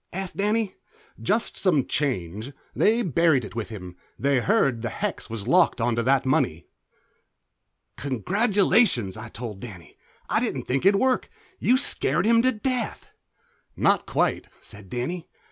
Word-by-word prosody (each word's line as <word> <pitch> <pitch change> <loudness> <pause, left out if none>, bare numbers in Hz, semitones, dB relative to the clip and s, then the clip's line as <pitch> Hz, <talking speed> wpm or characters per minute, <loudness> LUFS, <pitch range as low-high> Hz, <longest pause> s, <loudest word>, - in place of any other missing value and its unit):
asked 190 0 -5
Danny. 210 0 0 0.5
"Jest 215 +4 0
some 155 -9 +2
change. 110 - -2 0.2
They 230 +3 +3
buried 160 - +2
it - - -10
with 115 -1 -4
him; 90 -5 -9 0.2
they 140 -1 +2
heard 135 - +1
the 115 - -2
hex 200 - -4
was 110 -3 -5
locked 175 -6 +3
onto 115 0 +1
that 135 +3 +2
money." 130 - 0 1.3
"Congratulations," 185 - +2
I 110 0 -8
told 110 -3 -7
Danny. 95 -8 -11 0.3
"I - - +1
didn't - - -2
think 135 +8 +1
it'd 200 0 +4
work. 260 -1 +1 0.3
You 255 - +3
scared 180 - +2
him 230 +1 +5
to 255 +2 +3
death." 250 0 -3 0.6
"Not - - +2
quite," - - 0
said 100 -2 -12
Danny. 160 +9 -4
140 Hz, 145 wpm, -25 LUFS, -, 1.3 s, him